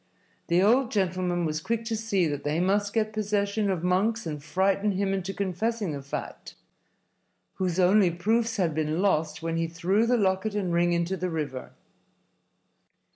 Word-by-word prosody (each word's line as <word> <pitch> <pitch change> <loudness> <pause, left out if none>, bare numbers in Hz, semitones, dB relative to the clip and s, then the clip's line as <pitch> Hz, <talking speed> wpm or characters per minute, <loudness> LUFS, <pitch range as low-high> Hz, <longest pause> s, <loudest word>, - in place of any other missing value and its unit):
The 175 +2 +3
old 240 +4 +4
gentleman 185 -4 0
was 155 0 -2
quick 230 +5 -2
to 225 -1 -1
see 210 -5 0
that 145 -3 -3
they 150 +2 0
must 200 +3 +1
get 215 -1 0
possession 205 0 0
of 180 -3 -1
Monks 205 +6 +1
and 150 -3 -5
frighten 195 +5 +1
him 195 +1 0
into 195 0 -2
confessing 200 +1 -2
the 140 -1 -5
fact 140 - -7 1.0
whose 185 -1 -1
only 185 +1 +5
proofs 225 +7 0
had 175 -5 +1
been 155 +1 -1
lost 160 -5 0
when 165 0 -1
he 165 0 0
threw 185 +7 +1
the 245 +1 +3
locket 195 +1 0
and 185 -4 -1
ring 175 0 +2
into 170 +2 0
the 185 +1 -2
river. 145 -6 -4
190 Hz, 170 wpm, -27 LUFS, 170-210 Hz, 1.0 s, only